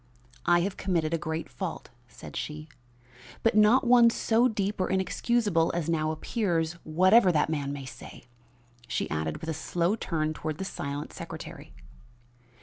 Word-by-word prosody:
"I 175 Hz, 0 st, +5 dB
have 195 Hz, +2 st, -2 dB
committed 170 Hz, -4 st, 0 dB
a -, -, +2 dB
great 160 Hz, 0 st, -3 dB
fault," 125 Hz, -2 st, -6 dB, 0.2 s
said -, -, -12 dB
she, 150 Hz, +1 st, -5 dB, 0.8 s
"but 225 Hz, -, +3 dB
one 240 Hz, +3 st, +6 dB
not -, -, +4 dB
so 230 Hz, +2 st, +2 dB
deep 205 Hz, -3 st, -2 dB
or 185 Hz, -, 0 dB
inexcusable 190 Hz, -2 st, +1 dB
as 170 Hz, -2 st, -1 dB
now 155 Hz, -2 st, +1 dB
appears, 165 Hz, 0 st, -1 dB
whatever 185 Hz, +5 st, +5 dB
that 155 Hz, -1 st, +1 dB
man 140 Hz, -3 st, -2 dB
may 140 Hz, -1 st, -6 dB
say," 130 Hz, -, -11 dB, 0.6 s
she -, -, -2 dB
added 80 Hz, 0 st, -2 dB
with 160 Hz, -, -5 dB
a -, -, -2 dB
slow 170 Hz, +5 st, 0 dB
turn 155 Hz, -7 st, -2 dB
toward 155 Hz, 0 st, -4 dB
the 190 Hz, -, -4 dB
silent 140 Hz, -5 st, -5 dB
secretary. -, -, -8 dB
165 Hz, 155 wpm, -28 LUFS, 155-200 Hz, 0.8 s, one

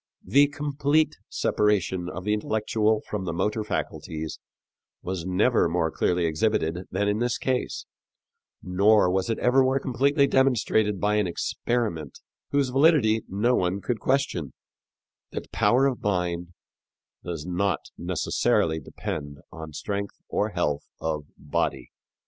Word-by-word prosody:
The 140 Hz, +1 st, +5 dB
complete 145 Hz, +1 st, 0 dB
separation 95 Hz, -4 st, +1 dB
of 90 Hz, 0 st, -6 dB
the 105 Hz, +2 st, +1 dB
intellectual 110 Hz, 0 st, +1 dB
from 105 Hz, -3 st, -3 dB
the 85 Hz, -, -2 dB
motor 105 Hz, +5 st, 0 dB
faculties 80 Hz, -6 st, -4 dB, 0.6 s
was 90 Hz, -1 st, -4 dB
never 95 Hz, +1 st, +3 dB
more 80 Hz, -1 st, 0 dB
clearly 90 Hz, +1 st, +1 dB
exhibited 85 Hz, 0 st, 0 dB
than 100 Hz, +3 st, 0 dB
in 105 Hz, +1 st, +1 dB
this 120 Hz, -1 st, 0 dB
case, 130 Hz, 0 st, -2 dB, 0.8 s
nor 100 Hz, +1 st, +4 dB
was 95 Hz, +3 st, 0 dB
it 115 Hz, -, 0 dB
ever 125 Hz, +2 st, +4 dB
more 130 Hz, +1 st, +2 dB
completely 140 Hz, +3 st, +2 dB
demonstrated 110 Hz, -7 st, +2 dB
by 105 Hz, +2 st, +2 dB
an 105 Hz, -3 st, +2 dB
experiment, 85 Hz, -, -2 dB, 0.3 s
whose 140 Hz, -2 st, +1 dB
validity 135 Hz, -5 st, +4 dB
no 105 Hz, +6 st, +1 dB
one 95 Hz, -3 st, +1 dB
could 115 Hz, +2 st, -2 dB
question, 130 Hz, -, 0 dB, 0.8 s
that -, -, -6 dB
power 130 Hz, +3 st, +3 dB
of 135 Hz, -3 st, 0 dB
mind 90 Hz, -3 st, -1 dB, 0.7 s
does 85 Hz, -3 st, -5 dB
not 90 Hz, -2 st, -1 dB
necessarily 80 Hz, 0 st, +1 dB
depend 70 Hz, 0 st, -6 dB
on 80 Hz, -1 st, -8 dB
strength 100 Hz, +6 st, -4 dB
or -, -, 0 dB
health 75 Hz, -1 st, -2 dB
of 75 Hz, -2 st, -2 dB
body. 75 Hz, -, -2 dB
105 Hz, 130 wpm, -26 LUFS, 85-125 Hz, 0.8 s, The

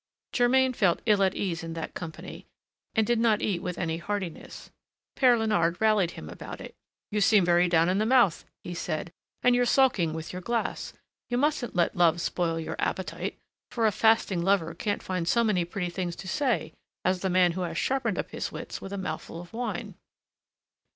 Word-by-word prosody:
Germain 260 Hz, +1 st, +3 dB
felt 190 Hz, -7 st, +2 dB
ill 210 Hz, -3 st, +4 dB
at 190 Hz, -1 st, +2 dB
ease 180 Hz, -3 st, -2 dB
in 165 Hz, 0 st, -5 dB
that 165 Hz, -1 st, -5 dB
company, 165 Hz, -3 st, -8 dB, 0.5 s
and 220 Hz, -1 st, +3 dB
did 240 Hz, +1 st, +1 dB
not 225 Hz, -2 st, +2 dB
eat 185 Hz, -5 st, 0 dB
with 180 Hz, -1 st, -4 dB
any 165 Hz, -2 st, -1 dB
heartiness. 190 Hz, -1 st, -5 dB, 0.4 s
Père 250 Hz, -3 st, +5 dB
Léonard 205 Hz, -7 st, +1 dB
rallied 215 Hz, -5 st, +3 dB
him 75 Hz, -, -8 dB
about 85 Hz, -, -8 dB
it. -, -, -9 dB, 0.4 s
"You 210 Hz, 0 st, 0 dB
seem 205 Hz, -2 st, +5 dB
very 175 Hz, +1 st, +4 dB
down 165 Hz, -1 st, +4 dB
in 185 Hz, +2 st, +1 dB
the 215 Hz, -, +2 dB
mouth," 235 Hz, -9 st, +4 dB, 0.2 s
he 175 Hz, -, -6 dB
said, 165 Hz, -1 st, -3 dB, 0.3 s
"and 250 Hz, -, +5 dB
you're 245 Hz, 0 st, +3 dB
sulking 240 Hz, -10 st, +3 dB
with 160 Hz, +1 st, -6 dB
your 180 Hz, -, -5 dB
glass. 235 Hz, +3 st, -2 dB, 0.4 s
You 245 Hz, -, 0 dB
mustn't 270 Hz, -5 st, 0 dB
let 175 Hz, -1 st, +2 dB
love 170 Hz, -1 st, +4 dB
spoil 170 Hz, -1 st, -1 dB
your 160 Hz, -, -5 dB
appetite, -, -, -3 dB, 0.3 s
for 230 Hz, -2 st, 0 dB
a 215 Hz, -, +4 dB
fasting 220 Hz, -4 st, +3 dB
lover 175 Hz, -3 st, +1 dB
can't 205 Hz, -1 st, -2 dB
find 180 Hz, -3 st, -2 dB
so 235 Hz, +6 st, +3 dB
many 195 Hz, -6 st, +1 dB
pretty 175 Hz, 0 st, -4 dB
things 175 Hz, -1 st, -3 dB
to 190 Hz, -, -9 dB
say 245 Hz, -, 0 dB, 0.3 s
as 185 Hz, 0 st, +2 dB
the 190 Hz, -, -1 dB
man 180 Hz, -1 st, +4 dB
who 185 Hz, +2 st, -4 dB
has 165 Hz, -2 st, -3 dB
sharpened 270 Hz, 0 st, 0 dB
up -, -, -3 dB
his -, -, -4 dB
wits -, -, -7 dB
with 195 Hz, -, -7 dB
a 200 Hz, -, -3 dB
mouthful 165 Hz, -2 st, -5 dB
of 175 Hz, 0 st, -11 dB
wine." 225 Hz, -3 st, -4 dB
190 Hz, 200 wpm, -27 LUFS, 170-225 Hz, 0.5 s, Père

